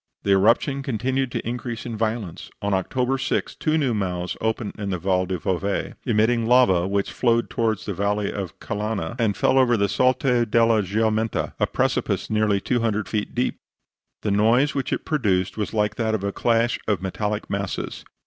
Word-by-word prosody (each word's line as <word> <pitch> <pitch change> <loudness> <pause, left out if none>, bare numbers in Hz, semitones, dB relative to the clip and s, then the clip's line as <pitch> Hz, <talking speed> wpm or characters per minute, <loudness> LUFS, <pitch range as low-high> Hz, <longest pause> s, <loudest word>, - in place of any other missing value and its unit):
The 100 - +1
eruption 115 +8 +3
continued 130 +1 -1
to - - -4
increase 120 0 -4
in 120 -2 -4
violence. 110 -5 -3
On 100 0 -1
October 125 +7 0
6 135 - -1
two 155 0 0
new 135 -6 +1
mouths 90 -4 -2
opened 110 -1 -1
in 100 -1 -3
the 90 - -1
Val 95 +1 0
del 95 0 -2
Bove, 95 +4 -2
emitting 115 0 +2
lava 105 -8 +4
which 100 0 -1
flowed 115 -1 +1
towards 110 -2 0
the 100 - -3
valley 100 +2 -1
of 100 -3 -6
Calanna, 105 -1 -3
and 110 -4 +1
fell 135 - +3
over 120 -2 +4
the 100 -1 +2
Salto 125 +2 +2
della 115 -1 +3
Giumenta, 110 +2 0
a - - +2
precipice - - -1
nearly 105 -2 +2
200 110 -2 0
feet 105 -2 -3
deep. 125 +1 -1 0.6
The 105 - 0
noise 115 +8 +3
which 135 -2 -2
it - - -2
produced 95 - 0
was 105 -2 -3
like 105 -1 0
that 110 -2 +1
of 100 - -4
a 100 - -1
clash 115 0 +1
of 100 -4 0
metallic 105 +2 -2
masses. 100 -1 -4
110 Hz, 180 wpm, -23 LUFS, 100-120 Hz, 0.6 s, lava